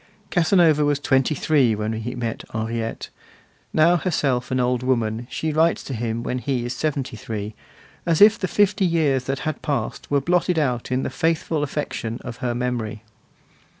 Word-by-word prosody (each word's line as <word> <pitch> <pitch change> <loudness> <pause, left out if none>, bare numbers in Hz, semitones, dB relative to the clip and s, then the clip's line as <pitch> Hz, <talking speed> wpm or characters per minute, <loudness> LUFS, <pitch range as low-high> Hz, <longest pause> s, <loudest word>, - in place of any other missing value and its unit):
Casanova 165 -3 +4
was 145 -1 +2
twenty 135 +1 +2
three 135 -6 +3
when 105 +1 -2
he 110 +3 -4
met 120 -2 -4
Henriette; 115 +1 -3 0.6
now, 170 +3 +4
herself 140 -8 0
an 130 - 0
old 125 0 +1
woman, 120 -2 0
she 160 -1 -2
writes 165 +2 +2
to 135 - -6
him 115 0 -2
when 125 +1 -2
he 125 -2 -2
is 120 - -3
seventy 135 -3 -2
three, 110 -1 -5 0.5
as 165 -2 +1
if 215 +2 +7
the 190 - -1
fifty 205 +1 +2
years 155 -7 +2
that 135 +1 -2
had 155 -1 -3
passed 140 -7 -3
were 145 - +3
blotted 175 +3 +1
out 125 -5 0
in 130 +1 +1
the - - -3
faithful 165 -2 0
affection 140 -5 -3
of 115 - -7
her 120 -1 -2
memory. 120 -3 -3
130 Hz, 175 wpm, -23 LUFS, 120-155 Hz, 0.6 s, if